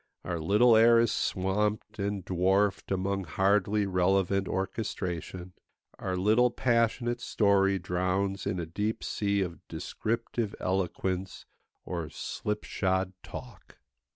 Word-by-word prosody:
Our 85 -2 -3
little 105 +8 +5
air 115 +1 +7
is 115 -1 +3
swamped 105 +3 -1
and 100 -2 -2
dwarfed 95 +2 +1
among 95 0 -1
hardly 100 +4 +2
relevant 95 +1 +1
orchestration; 95 -3 -4 0.5
our 95 -1 -2
little 110 +6 +4
passionate 120 0 +1
story 100 -3 +3
drowns 95 +2 -1
in 90 - -1
a 85 - -2
deep 105 +7 -3
sea 100 -1 0
of 85 -3 -3
descriptive 110 +5 -3
eloquence 95 0 -2 0.4
or 85 -4 -4
slipshod 95 0 -2
talk. - - -10
95 Hz, 110 wpm, -29 LUFS, 90-105 Hz, 0.5 s, air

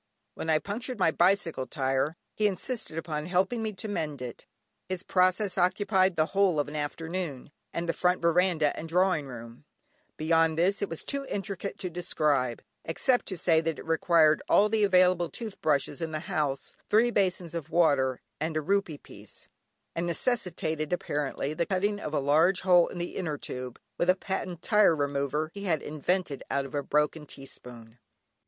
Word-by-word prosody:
When 160 - -5
I 155 - +5
punctured 225 - -5
my 180 -4 +3
bicycle 170 -6 +2
tyre 135 +3 -1 0.2
he 215 - +2
insisted 205 -3 -3
upon 155 -1 -3
helping 190 +6 +1
me 220 -1 -2
to 205 - -6
mend 155 -8 -3
it. 125 -2 -8 0.4
His 185 0 -3
process 185 +1 +2
occupied 190 0 +2
the 155 - +3
whole 195 -5 +3
of 145 - 0
an 150 - -7
afternoon, 155 -1 -4 0.2
and 170 +1 -3
the 165 - +1
front 180 0 +2
veranda 170 -2 +2
and 165 - -7
drawing 180 -4 +2
room; 115 -1 -10 0.5
beyond 160 0 +2
this, 185 +4 +2
it 200 - -1
was 165 - -5
too 280 -1 -3
intricate 200 0 -4
to 185 - -4
describe, 150 -8 0 0.2
except 245 +10 +1
to 190 - -4
say 160 -1 +3
that 165 -1 -2
it - - -9
required 160 -1 +4
all 210 +1 +5
the 215 -1 +2
available 180 -3 +4
tooth 220 -4 -7
brushes 145 0 0
in 160 -1 -3
the 155 - -2
house, 150 -7 -2
three 230 +3 +4
basins 185 -5 0
of 165 -2 -5
water, 140 -7 +2 0.2
and 155 +1 -2
a - - +1
rupee 190 -2 0
piece, - - -14 0.5
and 170 +1 -1
necessitated, 170 -6 -1
apparently, 145 -4 -2
the 170 +2 -1
cutting 205 +2 0
of 155 - -5
a 150 - +1
large 160 +7 +3
hole 180 -2 +5
in - - -8
the 175 0 -4
inner 160 -6 -2
tube, 125 -2 -6 0.2
with 175 - +1
a 185 - +6
patent 185 -3 -4
tyre 210 -6 +5
remover 145 +2 -1
he 200 0 -7
had 160 -6 0
invented 155 0 -1
out 140 0 0
of 135 - -10
a 145 - 0
broken 150 +1 0
teaspoon. 125 -4 -11
170 Hz, 180 wpm, -28 LUFS, 150-190 Hz, 0.5 s, a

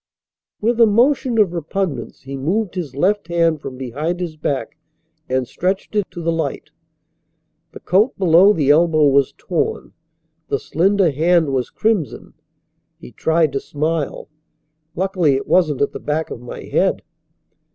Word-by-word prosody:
With 235 +2 +1
a 230 - +7
motion 245 +2 +2
of 200 -5 +3
repugnance 170 -1 -4
he 135 +1 -7
moved 180 +9 -1
his 165 -8 -5
left 190 +5 +1
hand 165 -3 +1
from 130 - -7
behind 145 +8 -3
his 170 -3 -4
back 145 -3 -3 0.5
and 130 -1 0
stretched 190 - -3
it 205 -3 0
to 170 - -8
the 165 - +1
light. 155 -3 -3 1.0
The - - -11
coat 210 +8 +2
below 185 +2 +5
the 145 -8 +2
elbow 155 0 +4
was 140 0 +2
torn. 175 -3 -3 0.5
The 140 - 0
slender 185 +4 +1
hand 160 0 +2
was 125 -2 -1
crimson. 215 -9 -2 0.7
He 60 - -12
tried 160 -2 +1
to 135 - 0
smile. 155 +1 -3 0.7
"Luckily 180 -6 +1
it 135 - -3
wasn't 155 -7 +2
at - - -1
the - - -7
back 155 +2 -2
of 115 - -7
my 125 - -8
head." - - 0
165 Hz, 150 wpm, -19 LUFS, 145-190 Hz, 1.0 s, a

